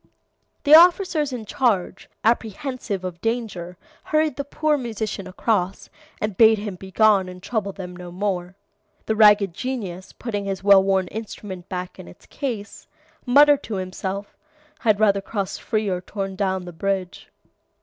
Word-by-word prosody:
"The 290 - +4
officers 335 -3 +6
in 240 -4 -5
charge, 205 -6 -1
apprehensive 230 -2 -1
of 180 -2 -6
danger, 215 -7 -3 0.3
hurried 310 -2 +1
the 280 - -3
poor 300 +2 0
musician 220 -6 -4
across, 190 -1 -1 0.3
and 210 -2 -2
bade 220 +2 +6
him 205 -1 -5
begone 190 +1 +2
and 180 - -9
trouble 210 -4 -2
them 180 -2 -8
no 180 -1 -9
more. 185 -1 -3 0.5
The 220 - 0
ragged 210 -4 +5
genius, 195 -6 -5
putting 205 -4 -4
his 195 -1 -4
well 200 -1 +7
worn 190 -1 +1
instrument 200 -4 -8
back 180 -2 -5
in - - -10
its 85 - -15
case, 225 -7 -6 0.4
muttered 290 +3 +6
to 220 - -5
himself, 190 +1 -5 0.5
'I'd 215 -3 +3
either 200 -2 +3
crossed 195 -1 -4
free 215 -2 -1
or 180 -2 -1
torn 195 0 -5
down 190 -2 -1
the 175 - -9
bridge. 190 +1 -3
200 Hz, 150 wpm, -23 LUFS, 185-230 Hz, 0.5 s, well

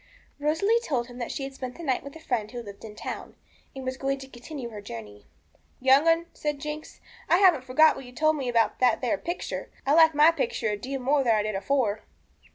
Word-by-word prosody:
Rosalie 325 +10 +2
told 255 - -1
him 245 +1 -10
that 240 - -3
she 275 - -4
had 270 0 -5
spent 255 -2 -6
the 340 - -9
night 265 -5 0
with 280 +2 -10
a - - -9
friend 230 -8 -2
who 240 0 -6
lived 200 -2 -11
in 215 -2 -9
the - - -12
town, - - -6 0.4
and 265 -1 -7
was 260 0 -3
going 275 0 -1
to 270 0 -10
continue 255 0 -8
her 210 -2 -8
journey. 105 - -9 0.5
'Young 265 +4 +5
'un,' 330 +1 +4
said 295 -1 -2
Jinx, 300 +2 -7 0.3
'I 345 - +6
haven't 355 -9 +5
forgot 310 +5 +5
what 270 - -9
you 245 - -11
told 310 +5 +2
me 270 -4 -3
about 230 -3 +2
that 245 -3 +3
there 260 +4 0
picture. 345 +1 -4 0.2
I 275 - +3
like 320 -1 +6
my 300 +3 +7
picture 400 - -1
a 210 - 0
deal 265 +6 -5
more 275 +2 +2
than 230 -3 +3
I 210 - +1
did 215 0 -2
afore.' 215 +1 0
265 Hz, 240 wpm, -27 LUFS, 235-305 Hz, 0.5 s, my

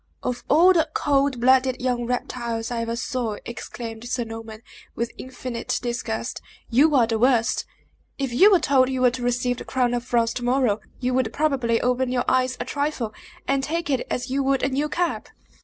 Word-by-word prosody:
"Of 245 -1 -3
all 345 +6 +6
the 325 -2 +2
cold 280 -3 +1
blooded 260 +1 +3
young 245 -2 -1
reptiles 235 -2 -3
I 235 -1 -1
ever 230 0 -2
saw," 235 -3 -2
exclaimed 230 0 -7
Sir 245 -1 -1
Norman, 225 -1 -9 0.3
with 235 0 -2
infinite 255 -2 -4
disgust, 235 -1 -3 0.3
"you 290 +6 +4
are 245 -4 +5
the 225 -1 -1
worst! 240 -2 +2 0.5
If 270 -3 -2
you 385 - +7
were 380 -4 +5
told 270 -4 +3
you 260 -1 -2
were 250 -1 +5
to 250 +1 -6
receive 245 0 0
the - - -7
crown 250 -2 0
of 240 -1 -1
France 235 -2 +1
to 245 - -5
morrow, 245 -4 +2 0.2
you 250 0 -1
would 250 -3 +1
probably 260 -5 +1
open 250 +1 +1
your 250 -1 0
eyes 255 0 +2
a 245 - -3
trifle, 280 -5 -2 0.3
and 275 0 +1
take 330 +1 -2
it 265 - -1
as 250 +1 -3
you 275 +1 +1
would 270 0 +1
a 270 - +2
new 285 +3 -1
cap!" 350 +1 -1
250 Hz, 195 wpm, -24 LUFS, 235-270 Hz, 0.5 s, you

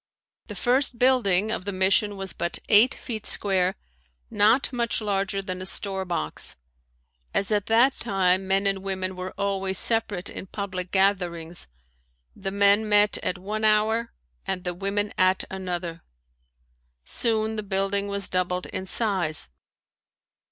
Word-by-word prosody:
The - - -8
first 250 0 +1
building 220 -6 +3
of 225 - -2
the 200 - -2
mission 195 +2 +1
was 195 -1 -4
but 170 0 -2
eight 220 +4 +6
feet 220 -3 -6
square, 190 -2 +3 0.6
not 225 +7 +3
much 235 -1 0
larger 195 -2 -1
than 185 -1 -5
a - - -4
storebox. 190 - -1 0.8
As 195 +1 0
at 205 -1 0
that 235 +4 +4
time 190 -5 0
men 195 +1 +1
and 195 -1 +2
women 190 -1 -4
were 185 0 -7
always 195 -1 0
separate 215 -5 +2
in 190 - -5
public 185 -3 -5
gatherings, 175 - 0 0.7
the 195 - -4
men 200 +2 +3
met 205 0 +4
at 180 - -2
one 210 +4 -5
hour 220 +2 +2 0.4
and 185 -1 -3
the 180 - -3
women 200 +3 -2
at 185 0 +3
another. 175 -3 -5 1.0
Soon 220 - -1
the 215 - -2
building 200 0 0
was 200 -1 -1
doubled 180 0 -1
in 190 0 -6
size. 185 - 0
195 Hz, 140 wpm, -25 LUFS, 185-215 Hz, 1.0 s, eight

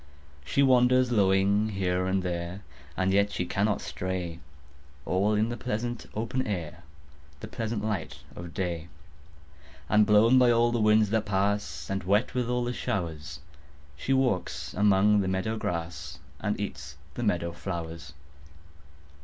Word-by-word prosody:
She 70 - +2
wanders 125 -1 +4
lowing 100 0 +3
here 90 -2 -1
and 95 0 0
there, 90 +2 -4 0.3
And 95 0 +1
yet 100 +1 +3
she 90 - -2
cannot 100 +3 0
stray, 85 +1 -4 0.7
All 100 +4 +1
in 110 +2 +1
the 120 - -4
pleasant 120 +3 -3
open 115 +4 -2
air, 85 -4 -4 0.6
The - - -7
pleasant 115 -3 -3
light 105 -6 -3
of 85 -1 -8
day; 85 -2 -3 1.0
And 105 0 +4
blown 110 +4 +6
by 125 -1 +5
all 120 0 +4
the 120 -1 0
winds 105 -1 +4
that 110 -2 0
pass 100 -8 -1
And 95 0 -2
wet 100 +6 +1
with 125 -1 -1
all 125 0 0
the 120 +1 -2
showers, 80 - -4 0.5
She 75 - -4
walks 90 - 0
among 105 +1 +4
the 95 - -1
meadow 95 +4 -1
grass 85 -5 -4 0.2
And 105 -1 -2
eats 75 -8 -6 0.2
the - - -5
meadow 85 -6 0
flowers. 85 -4 -6
100 Hz, 145 wpm, -28 LUFS, 85-110 Hz, 1.0 s, blown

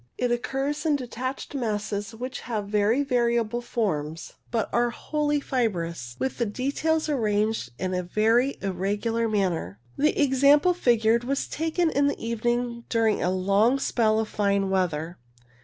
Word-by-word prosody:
It 245 -1 0
occurs 270 +4 -1
in 310 -3 +2
detached 255 +1 -5
masses 210 -4 -3
which 255 +2 -5
have 215 -4 -3
very 210 +6 +2
variable 235 -3 +1
forms 165 -10 -3 0.2
but 225 -3 0
are 240 0 +3
wholly 295 +4 -1
fibrous, 170 - -2
with 265 - -3
the 235 - +2
details 285 +8 0
arranged 215 - 0
in 185 0 -2
a 180 - 0
very 225 +8 +2
irregular 205 +5 -1
manner. 175 - -1 0.2
The 300 +2 +2
example 285 +5 +5
figured 235 -7 +2
was 275 +3 -1
taken 325 +1 0
in 280 +1 +2
the 285 - -1
evening 235 +1 -1
during 225 -2 +2
a 180 - +1
long 200 +7 +3
spell 220 -5 +1
of 220 - -1
fine 200 -2 0
weather. 175 -3 -1
230 Hz, 145 wpm, -26 LUFS, 205-265 Hz, 0.2 s, example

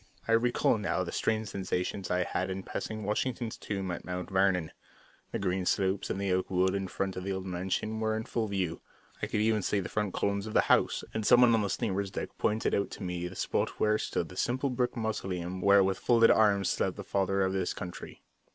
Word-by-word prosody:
I - - 0
recall 115 -1 +3
now 95 -2 0
the 85 - -5
strange 110 -2 0
sensations 95 0 -3
I 90 0 +2
had 100 - -2
in 95 0 -4
passing 110 +2 -5
Washington's 115 +2 -1
tomb 95 -3 -4
at 90 - -5
Mount 90 +1 -5
Vernon. 95 -4 +2 0.6
The - - -1
green 95 -1 -1
slopes 95 0 +1
and - - -2
the 100 -2 0
oak 95 0 0
wood 95 0 +2
in 95 -1 -2
front 95 0 -3
of 90 - -4
the 100 - -2
old 95 0 -3
mansion 95 +4 -2
were 110 0 0
in 110 - -3
full 115 -1 -2
view. 95 -5 -2 0.4
I - - -1
could 105 - 0
even 110 -1 +2
see 100 +2 0
the 95 - -4
front 105 -3 -2
columns 100 +1 0
of 110 - -6
the - - +7
house, - - +3
and 110 - -2
someone 120 +2 +6
on 115 - +3
the 100 - -1
steamer's 100 -4 -1
deck - - -4
pointed 110 +1 +1
out 100 - +1
to - - -8
me 90 -1 -3
the 90 - -9
spot - - -1
where 110 0 +3
stood 85 - -2
the 90 - -11
simple 130 +5 0
brick 125 0 -1
mausoleum 95 -5 -3
where 100 0 +6
with 95 -1 0
folded 115 -1 +5
arms 100 -3 +4
slept - - 0
the - - -5
Father 95 0 +1
of 95 0 0
his 95 -2 0
Country. 90 -1 -8
100 Hz, 225 wpm, -30 LUFS, 95-110 Hz, 0.6 s, the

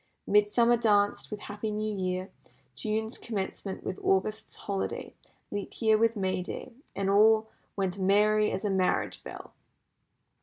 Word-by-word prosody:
Midsummer 220 +4 +4
danced 205 -3 +2
with 210 -1 -6
Happy 205 +1 -4
New 215 0 -2
Year, 185 0 -2 0.4
June's 220 +1 -3
Commencement 195 -3 -4
with 185 - -4
August's 215 +3 0
Holiday, 195 -1 -4 0.4
Leap 205 -1 -5
Year 220 -2 +4
with 230 +1 +3
May 185 -2 0
Day, 180 - -7 0.2
and 195 -1 -1
all 220 +2 +5 0.3
"went 195 -1 -1
merry 210 +2 +4
as 190 +3 -3
a 205 - +1
marriage 185 -1 0
bell." - - -9
205 Hz, 140 wpm, -29 LUFS, 195-215 Hz, 0.4 s, all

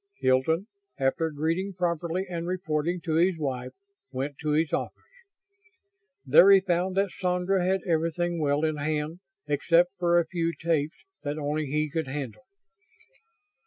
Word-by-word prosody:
Hilton, 130 +8 +2 0.3
after 150 +5 +1
greeting 165 +6 -2
properly 175 0 -1
and 170 -1 -4
reporting 175 -1 -1
to 160 -2 -1
his 175 +1 +3
wife, 130 -5 -3 0.4
went 135 +2 -3
to 155 - -2
his 155 +1 +1
office. - - -1 1.3
There 150 +8 +7
he 195 -1 +8
found 185 0 -1
that 195 -1 +2
Sandra 180 +1 0
had 190 +1 +1
everything 170 0 0
well 145 +1 +1
in 155 -1 -1
hand 155 +3 -2 0.3
except 170 +5 +3
for 175 -1 +4
a 170 - +1
few 165 0 -1
tapes 160 -2 0 0.2
that 145 +1 -3
only 150 0 -2
he 150 +2 0
could 160 0 -3
handle. 140 - -6
165 Hz, 145 wpm, -27 LUFS, 150-180 Hz, 1.3 s, he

